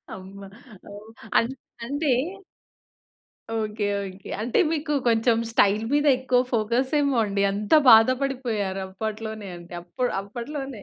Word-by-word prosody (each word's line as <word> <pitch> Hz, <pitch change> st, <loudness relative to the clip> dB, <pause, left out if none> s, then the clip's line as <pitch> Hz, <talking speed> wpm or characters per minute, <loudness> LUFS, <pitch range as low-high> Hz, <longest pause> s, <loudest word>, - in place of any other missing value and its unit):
అమ్మ! 190 Hz, +1 st, -11 dB, 0.5 s
ఒహ్! 205 Hz, +2 st, -11 dB, 0.3 s
అన్ 230 Hz, -, +2 dB, 0.4 s
అంటే 285 Hz, +3 st, -1 dB, 1.4 s
okay. 215 Hz, -1 st, -2 dB, 0.2 s
Okay. 190 Hz, 0 st, -10 dB
అంటే 235 Hz, +2 st, 0 dB
మీకు 310 Hz, -1 st, -2 dB, 0.2 s
కొంచెం 230 Hz, 0 st, +3 dB
స్టైల్ 210 Hz, -1 st, +3 dB
మీద 290 Hz, +1 st, +2 dB
ఎక్కువ 255 Hz, -1 st, +2 dB
ఫోకస్ 235 Hz, +3 st, 0 dB
ఏమో 280 Hz, -2 st, +1 dB
అండి 200 Hz, -1 st, -1 dB
అంత 205 Hz, +1 st, -4 dB, 0.2 s
బాధపడిపోయారు 230 Hz, -4 st, +3 dB
అప్పట్లోనే 215 Hz, +1 st, -5 dB
అంటే 175 Hz, +1 st, -12 dB
అప్పుడ్ 210 Hz, +9 st, -3 dB
అప్పట్లోనే. 245 Hz, +3 st, -7 dB
225 Hz, 115 wpm, -24 LUFS, 205-255 Hz, 1.4 s, కొంచెం